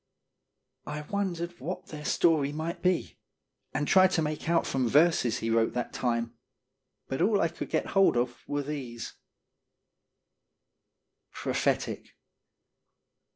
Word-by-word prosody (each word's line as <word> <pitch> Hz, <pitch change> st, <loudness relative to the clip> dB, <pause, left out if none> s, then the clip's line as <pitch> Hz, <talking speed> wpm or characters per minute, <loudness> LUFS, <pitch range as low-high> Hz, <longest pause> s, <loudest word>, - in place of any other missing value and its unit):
I 150 Hz, 0 st, -4 dB
wondered 175 Hz, 0 st, -3 dB
what 170 Hz, +8 st, -5 dB
their 150 Hz, -1 st, -8 dB
story 155 Hz, -4 st, +3 dB
might 160 Hz, +3 st, -4 dB
be, 180 Hz, -1 st, 0 dB, 0.5 s
and 145 Hz, +2 st, -1 dB
tried 185 Hz, 0 st, +6 dB
to 165 Hz, -, +2 dB
make 155 Hz, +1 st, -3 dB
out 170 Hz, -1 st, +3 dB
from 130 Hz, -2 st, 0 dB
verses 145 Hz, -3 st, +3 dB
he 115 Hz, -, -2 dB
wrote 115 Hz, 0 st, +2 dB
that 125 Hz, -1 st, -3 dB
time, 115 Hz, -1 st, -1 dB, 0.7 s
but 135 Hz, +3 st, -3 dB
all 200 Hz, +2 st, +3 dB
I 165 Hz, -, +2 dB
could 170 Hz, -, -7 dB
get -, -, 0 dB
hold 195 Hz, -10 st, +5 dB
of 120 Hz, 0 st, -1 dB
were 145 Hz, 0 st, -1 dB
these: 130 Hz, -5 st, -6 dB, 2.2 s
PROPHETIC. -, -, -1 dB
150 Hz, 125 wpm, -29 LUFS, 125-170 Hz, 2.2 s, tried